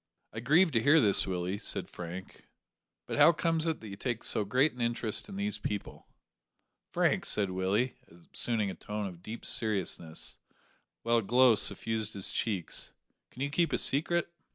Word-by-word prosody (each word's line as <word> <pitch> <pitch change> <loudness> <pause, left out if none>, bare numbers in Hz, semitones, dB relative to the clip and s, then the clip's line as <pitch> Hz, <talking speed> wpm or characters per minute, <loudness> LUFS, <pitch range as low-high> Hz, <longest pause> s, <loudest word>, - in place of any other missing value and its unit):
"I 110 - -5
grieve 160 +9 +4
to 115 - +2
hear 150 +7 +5
this, 105 -7 +5
Willie," 90 +1 -2
said - - 0
Frank, 90 +2 -9 0.6
"but - - -4
how 150 +3 +8
comes 165 0 0
it 160 - -2
that 110 - -9
you 100 - -7
take 120 +2 -3
so 110 - +1
great 130 +9 +2
an 125 - -8
interest 115 - -1
in 195 - -8
these 205 +1 -2
people?" 105 -1 -5 0.8
"Frank," - - +1
said 100 -3 +1
Willie, 95 +7 0
assuming 100 +5 -3
a - - -6
tone 105 +1 -5
of 90 -3 -8
deep 110 +5 -8
seriousness, 95 -7 -2 0.6
while 115 0 +2
a - - +2
glow 125 +3 +5
suffused 110 0 0
his 100 - -1
cheeks, 100 -7 -2 0.4
"can 130 - -6
you 140 - -2
keep 170 +3 +1
a - - +1
secret?" 170 +5 +1
115 Hz, 175 wpm, -30 LUFS, 100-140 Hz, 0.8 s, how